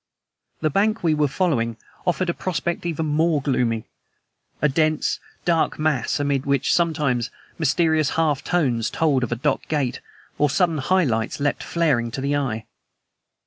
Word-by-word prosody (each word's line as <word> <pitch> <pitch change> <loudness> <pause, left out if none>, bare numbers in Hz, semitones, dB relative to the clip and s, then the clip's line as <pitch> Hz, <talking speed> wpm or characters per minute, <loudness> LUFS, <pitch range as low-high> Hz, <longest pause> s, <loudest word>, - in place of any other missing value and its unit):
The 155 - +1
bank 215 +5 +1
we 165 -2 +3
were 150 -1 +2
following 130 - 0 0.3
offered 180 0 +1
a - - -6
prospect 170 0 -2
even 160 -1 -2
more 155 +1 +2
gloomy 125 -5 0 0.7
a 150 - +3
dense, 155 +2 +1 0.3
dark 165 -2 +2
mass, 155 -5 0
amid 140 -2 0
which, 140 0 +1
sometimes, 150 -8 +1 0.3
mysterious 160 0 +2
half 155 -4 +1
tones 125 -10 +1
told 145 -5 +1
of 120 - -3
a - - +1
dock 135 +4 -1
gate, 135 -5 -1 0.4
or 150 - +4
sudden 165 0 +1
high 185 +7 +2
lights 115 -4 -1
leapt 145 0 0
flaring 150 -9 +1
to 115 - -5
the 140 +1 0
eye. 115 -6 -2
150 Hz, 155 wpm, -23 LUFS, 130-165 Hz, 0.7 s, or